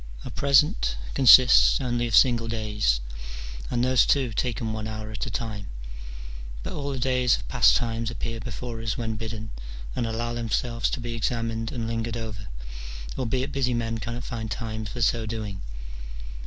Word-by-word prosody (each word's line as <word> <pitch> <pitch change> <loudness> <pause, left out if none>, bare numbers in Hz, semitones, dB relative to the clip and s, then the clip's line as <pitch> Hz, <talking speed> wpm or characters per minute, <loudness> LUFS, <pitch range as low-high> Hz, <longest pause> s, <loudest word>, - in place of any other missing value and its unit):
Our - - -6
present 135 - +3 0.2
consists 130 0 +8
only 120 -3 0
of 115 - +2
single 120 -3 +5
days, 105 - 0 0.7
and 120 - +1
those, 130 -2 +5
too, 130 -5 +2
taken 115 -1 -1
one 110 0 -4
hour 110 0 -5
at 110 - -4
a - - -3
time: 105 -5 -4 1.0
but - - -4
all 140 -1 -3
the 135 - -3
days 125 -1 +3
of - - -9
past - - +5
times 115 +2 0
appear 115 -1 -4
before 115 0 -5
us 115 -1 -1
when 115 -2 -2
bidden, 110 0 -5 0.4
and 120 - 0
allow 120 +1 -2
themselves 115 0 0
to - - -3
be 120 0 -4
examined 115 -1 -1
and 115 -2 -3
lingered 115 0 -2
over, 105 -3 -6 0.7
albeit 130 +2 -1
busy 130 -3 +1
men 115 -1 -1
cannot 120 +3 -4
find 110 -3 -4
time 110 -1 -4
for 115 +3 -3
so 110 +1 +2
doing. 105 -3 -4
115 Hz, 170 wpm, -26 LUFS, 110-120 Hz, 1.0 s, consists